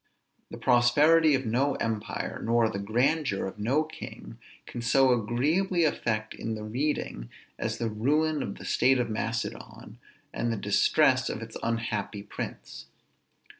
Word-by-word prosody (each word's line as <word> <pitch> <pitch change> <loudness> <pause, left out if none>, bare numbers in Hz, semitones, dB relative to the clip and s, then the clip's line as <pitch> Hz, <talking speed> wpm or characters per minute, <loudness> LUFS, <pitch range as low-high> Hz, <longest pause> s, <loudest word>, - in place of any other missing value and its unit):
The - - -8
prosperity 145 +6 +4
of 130 0 -2
no 130 +5 +1
empire, 110 -1 -3
nor 115 0 +3
the 100 - -4
grandeur 125 +3 0
of 95 +2 -7
no 130 +9 +1
king, 155 0 -10 0.3
can 120 - -7
so 130 +3 +4
agreeably 150 - +1
affect 110 -7 -1
in 110 0 -4
the 105 - -7
reading, 110 - -3 0.3
as - - -2
the 115 - -2
ruin 145 +8 +1
of - - -4
the - - -10
state 135 0 +3
of 120 -2 -1
Macedon, 115 +1 -5 0.3
and 120 - -1
the 115 - -2
distress 130 +6 +3
of 115 - -4
its 115 -1 -10
unhappy 110 -3 -2
prince. - - -7
120 Hz, 145 wpm, -28 LUFS, 110-145 Hz, 0.3 s, prosperity